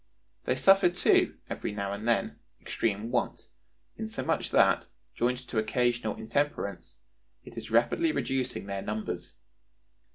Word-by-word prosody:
They - - +1
suffer, 195 +6 +6
too, 175 - +3
every - - -4
now 100 -1 -3
and 105 +3 -5
then, 120 - +1 0.2
extreme 110 +1 -2
want, 120 -1 -2 0.5
insomuch 220 0 -2
that, - - +4 0.3
joined 125 +5 +1
to 115 - 0
occasional 120 0 0
intemperance, 110 -8 -2 0.5
it - - -12
is 115 - -7
rapidly 120 - +3
reducing 130 - -2
their 100 -1 -4
numbers. 105 -6 -4
115 Hz, 125 wpm, -29 LUFS, 105-130 Hz, 0.5 s, suffer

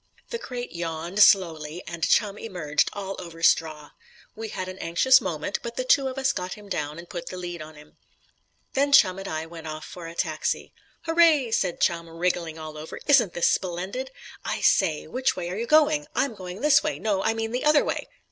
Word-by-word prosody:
The 470 - -3
crate 245 - -6
yawned 170 +2 -4
slowly, 165 -4 +4
and 170 0 -7
Chum 205 -3 +3
emerged 175 -9 -1
all 195 -1 -5
over 165 -2 -9
straw. 155 -3 +2 0.4
We 225 +1 -5
had 185 - -4
an 185 0 -8
anxious 260 +11 +4
moment, 175 -2 -3
but 235 0 -6
the 255 - -1
two 270 +1 +3
of 260 0 -5
us 270 0 +1
got 180 -1 -4
him 210 -1 -14
down 150 -3 -3
and 170 +1 -10
put 170 -1 -7
the 185 - -6
lead 175 -2 -6
on 155 0 -10
him. 150 0 -17 0.8
Then 280 +1 +1
Chum 190 -8 +6
and 195 - -6
I 160 0 -3
went 165 -1 -10
off 155 0 -6
for 175 -2 -9
a 165 - -9
taxi. 160 -3 -2 0.3
"Hooray," 325 -7 +4
said 185 -5 0
Chum, 170 -1 +1
wriggling 165 -1 -2
all 155 -1 -8
over, 155 - -8
"isn't 245 - +4
this 175 - +3
splendid? 190 +9 -2 0.3
I - - -3
say, - - +2
which 260 +1 0
way 175 -1 -4
are - - -4
you 235 +2 -3
going? 300 0 +4
I'm 260 -2 +1
going 185 -2 -8
this 290 -1 +5
way.... 310 0 -2
No, 205 -3 0
I 225 +3 +1
mean 225 0 -3
the 250 +2 -2
other 300 -1 +5
way." - - -3
185 Hz, 210 wpm, -25 LUFS, 165-245 Hz, 0.8 s, Chum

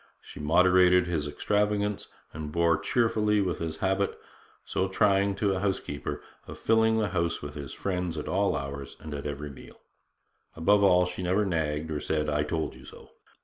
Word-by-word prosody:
She - - -12
moderated 90 +3 +5
his 80 -4 -2
extravagance, 105 +5 0 0.3
and 75 -1 -6
bore 85 +1 +3
cheerfully 110 -3 +1
with 95 -4 -1
his 80 -1 -4
habit, 95 +3 0 0.5
so 95 - -1
trying 100 0 +2
to 100 0 +1
a 95 - -2
housekeeper, 95 -7 -3 0.2
of - - -8
filling 110 0 +3
the 110 -2 +1
house 85 -2 -1
with 75 0 -6
his 70 -3 -7
friends 90 -4 -3
at 75 - -5
all 100 +2 +1
hours 70 -1 -6
and 80 -1 -8
at 70 0 -4
every 75 0 -5
meal. 70 - -14 0.8
Above 100 +5 +3
all, 90 -2 +5
she 90 0 -5
never 95 +4 +1
nagged, 80 -3 -1
or 75 - -2
said 75 0 -1
'I 75 0 +1
told 80 +1 -2
you - - -14
so.' - - -14
90 Hz, 180 wpm, -28 LUFS, 75-100 Hz, 0.8 s, moderated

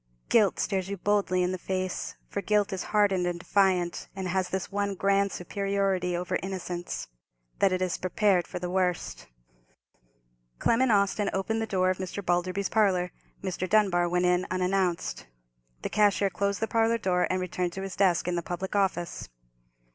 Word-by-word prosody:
Guilt 210 -4 +4
stares 190 -2 -1
you 200 - -3
boldly 195 -2 +1
in 180 - 0
the 185 - -4
face, 185 0 -3
for 200 - -3
guilt 210 -1 +1
is 190 - -3
hardened 195 -4 +2
and 175 -1 -2
defiant, 180 -1 +1
and 190 -1 -3
has 185 0 0
this 190 0 -3
one 200 0 -1
grand 200 +1 +2
superiority 195 -1 -1
over 180 0 -1
innocence—that 175 - -4
it 185 0 0
is 185 -1 -2
prepared 185 -1 +2
for - - -6
the 180 0 -4
worst. 180 - -1 1.3
Clement 240 +1 +3
Austin 200 0 +2
opened 220 +4 -1
the 225 - -2
door 185 -2 +2
of 185 - -4
Mr. 190 +1 -5
Balderby's 180 +2 0
parlour; 185 -5 +2 0.3
Mr. 185 -1 -3
Dunbar 190 -5 +3
went 180 +1 +1
in 180 0 +2
unannounced. 185 - -1 0.6
The - - -2
cashier 205 -1 +3
closed 200 +2 -1
the 225 - +1
parlour 230 +1 +2
door 180 -4 +1
and 185 - 0
returned 180 -1 -2
to 190 - -5
his 195 -2 -5
desk 185 -3 +2
in 180 - 0
the 170 - 0
public 180 +4 -4
office. 190 - -1
185 Hz, 170 wpm, -28 LUFS, 180-200 Hz, 1.3 s, Guilt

